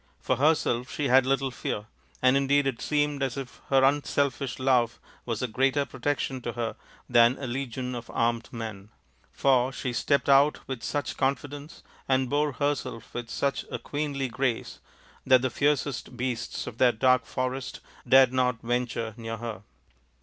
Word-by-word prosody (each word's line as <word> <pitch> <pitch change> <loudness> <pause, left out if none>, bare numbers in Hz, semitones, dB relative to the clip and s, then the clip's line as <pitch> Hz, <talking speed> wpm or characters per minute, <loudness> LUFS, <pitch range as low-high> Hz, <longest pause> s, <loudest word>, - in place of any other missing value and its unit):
For 130 - 0
herself 130 -4 +2
she 145 -3 -1
had 130 0 +5
little 135 0 +1
fear, 105 -3 -4 0.4
and 130 +1 +5
indeed 140 +1 +3
it 130 -3 -2
seemed 145 -1 0
as 135 -2 -1
if 130 -3 -7
her 135 -1 +4
unselfish 140 -1 +1
love 125 -3 +2 0.3
was 115 0 -2
a - - +1
greater 135 +4 +1
protection 135 -3 -2
to 120 - -4
her 115 -1 -3 0.3
than 120 +1 +5
a 140 - -5
legion 125 0 -4
of 120 -1 -7
armed 115 0 0
men; 110 -3 -7 0.4
for 130 -1 +2
she 125 -1 -4
stepped 140 +3 +1
out 140 +2 +4
with 130 -3 -5
such 145 -5 -3
confidence 140 +3 -3 0.3
and 130 -1 +2
bore 145 0 +1
herself 145 -6 -3
with 120 -1 -5
such 140 +3 -1
a - - -3
queenly 145 -2 -3
grace 125 -1 -2 0.4
that 130 -1 +5
the 130 - 0
fiercest 140 -3 -1
beasts 125 -2 -3
of 115 - -8
that 120 -3 +4
dark 125 -1 +3
forest 130 0 -3 0.3
dared 130 -1 +7
not 125 -2 +1
venture 120 -2 -2
near 115 -1 -5
her. 115 -3 -6
130 Hz, 165 wpm, -27 LUFS, 120-140 Hz, 0.4 s, dared